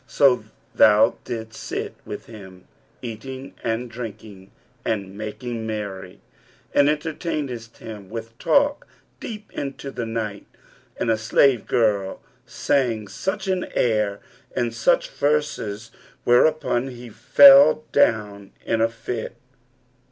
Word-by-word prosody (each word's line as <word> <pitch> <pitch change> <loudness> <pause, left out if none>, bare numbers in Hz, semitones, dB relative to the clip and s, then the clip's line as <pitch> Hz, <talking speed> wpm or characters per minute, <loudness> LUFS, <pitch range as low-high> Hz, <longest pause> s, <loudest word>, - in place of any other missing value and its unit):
So 125 -6 +3 0.3
thou 110 +1 +5
didst 110 -2 -5
sit - - -4
with - - -7
him, 95 -5 -12 0.4
eating 130 +4 -7
and 115 +2 -1
drinking 110 -4 -9 0.3
and 100 -3 -3
making 110 +2 -5
merry, 100 -4 -6 0.5
and 145 0 +5
entertainedst 150 -6 -3
him 105 -4 -9
with 115 0 -7
talk 285 0 +2 0.3
deep 215 -2 -8
into 140 0 -5
the 120 -3 -4
night 110 -3 -4 0.5
and 115 - 0
a 110 - +1
slave 120 +2 +3
girl 105 -5 +1 0.3
sang 115 -7 0
such 190 +1 -3
an 185 -1 0
air 105 -4 +1 0.4
and 120 -2 -1
such 115 - +2
verses, 120 -7 -1 0.3
whereupon 125 0 +3
he 125 -2 -9
fell 275 - +7
down 105 -6 +1
in 115 -1 0
a 115 - +3
fit.' 115 0 -5
115 Hz, 115 wpm, -23 LUFS, 105-135 Hz, 0.5 s, fell